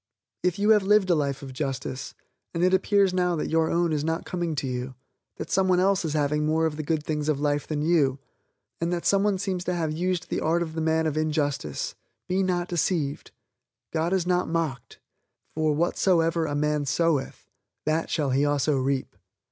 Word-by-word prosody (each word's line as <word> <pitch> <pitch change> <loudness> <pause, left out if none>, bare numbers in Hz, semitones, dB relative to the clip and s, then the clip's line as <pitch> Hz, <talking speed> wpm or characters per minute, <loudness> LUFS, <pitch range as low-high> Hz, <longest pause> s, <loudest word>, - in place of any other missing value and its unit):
If 180 +1 0
you 205 +2 +3
have 210 -1 +6
lived 195 -1 +3
a - - +6
life 140 -3 -1
of 135 -1 -8
justice, 135 -1 -4 0.4
and 165 - 0
it 185 +1 +3
appears 195 0 +3
now 180 -1 +1
that 155 - -3
your 160 0 +2
own 170 -1 +1
is 150 -1 0
not 160 +1 -2
coming 175 -3 -2
to 140 - -2
you, 125 0 -4 0.4
that - - -7
someone 185 -1 +3
else 195 +1 +2
is 160 -3 -2
having 150 0 +1
more 160 +1 +2
of 160 -2 -1
the 155 - -3
good 155 0 -1
things 150 -1 -2
of 145 -2 +1
life 145 0 0
than 150 -1 -2
you, 150 -5 +3 0.6
and 170 +1 -1
that 175 -1 -2
someone 200 0 +3
seems 185 -2 -2
to 180 - -1
have 160 -3 -1
used 175 +2 -2
the - - 0
art 170 +2 +1
of 160 -2 -7
the 160 - -3
man 160 0 +1
of 155 -1 -1
injustice, 145 - -1 0.3
be 185 +1 +1
not 180 -2 0
deceived, 165 -4 -1 0.6
God 165 +1 0
is 190 -3 +1
not 180 0 +1
mocked, 160 -8 -3 0.5
for 155 -1 +1
"whatsoever 165 0 +2
a 145 - -2
man 150 -1 0
soweth 155 -1 0 0.4
that 155 +2 0
shall 145 -5 0
he 135 +2 +2
also 145 0 +1
reap." 135 0 -1
160 Hz, 200 wpm, -26 LUFS, 145-180 Hz, 0.6 s, have